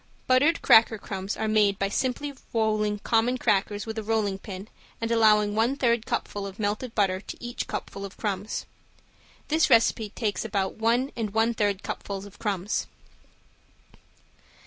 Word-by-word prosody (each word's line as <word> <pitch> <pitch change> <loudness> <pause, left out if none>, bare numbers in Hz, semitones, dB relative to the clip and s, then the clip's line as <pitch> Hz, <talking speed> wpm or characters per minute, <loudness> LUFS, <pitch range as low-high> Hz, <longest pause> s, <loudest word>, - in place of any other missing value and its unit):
Buttered 280 +6 +3
cracker 225 0 +6
crumbs 195 -1 -5
are 220 - -1
made 210 -2 +3
by 195 0 0
simply 260 +6 -2 0.2
rolling 215 -2 +1
common 230 +4 +1
crackers 205 -3 0
with 220 0 -4
a - - -5
rolling 210 -3 0
pin 195 0 -8 0.3
and 230 0 -2
allowing 210 -2 +4
one 230 +5 +2
third 235 -4 +1
cupful 200 -1 -2
of 195 0 -10
melted 215 +3 -2
butter 190 -3 +1
to - - -8
each 240 0 -5
cupful 200 - -5
of 200 -1 -8
crumbs. 205 0 -3 0.8
This 315 +1 +3
recipe 225 -1 +4
takes 210 -1 -2
about 195 -3 -2
one 235 +5 +1
and 220 -3 -3
one 225 +1 +3
third 205 -3 0
cupfuls 195 -1 -5
of 200 -1 -14
crumbs. 200 -1 -1
215 Hz, 155 wpm, -26 LUFS, 200-230 Hz, 0.8 s, cracker